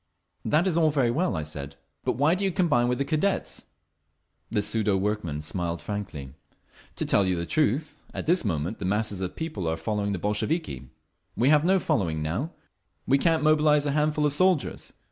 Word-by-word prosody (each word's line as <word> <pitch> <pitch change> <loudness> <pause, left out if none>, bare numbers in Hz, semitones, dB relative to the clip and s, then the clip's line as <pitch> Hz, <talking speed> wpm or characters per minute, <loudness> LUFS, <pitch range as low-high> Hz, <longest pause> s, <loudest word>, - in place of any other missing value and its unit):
"That 155 +4 +2
is 170 -3 +2
all 160 -2 +4
very 135 -5 +1
well," 175 +8 0
I 80 - -2
said. 70 -2 -6 0.3
"But - - +1
why 145 +5 +3
do 190 +2 -1
you 195 - +1
combine 150 -10 +2
with 125 0 0
the 140 - -1
Cadets?" 155 +7 -1 0.8
The 105 -3 0
pseudo 105 -1 +1
workman 95 -7 -2
smiled 85 +1 -2
frankly. 85 -11 -6 0.6
"To - - -2
tell 100 - +3
you 95 -1 +1
the 85 0 -3
truth, 150 - 0
at - - -5
this 175 +3 +3
moment 90 0 -2
the 100 - -4
masses 100 0 0
of 95 - -1
the - - -24
people 145 - -4
are 80 0 -1
following 105 +1 -2
the 100 - -1
Bolsheviki. 105 - -2 0.5
We 125 +4 +3
have 150 0 +5
no 190 +2 +3
following—now. 85 - -1 0.6
We 140 - +3
can't 165 -1 +2
mobilise 150 -1 +4
a 145 - +1
handful 150 +1 +1
of 145 - +1
soldiers. 185 0 +1
120 Hz, 190 wpm, -26 LUFS, 95-155 Hz, 0.8 s, have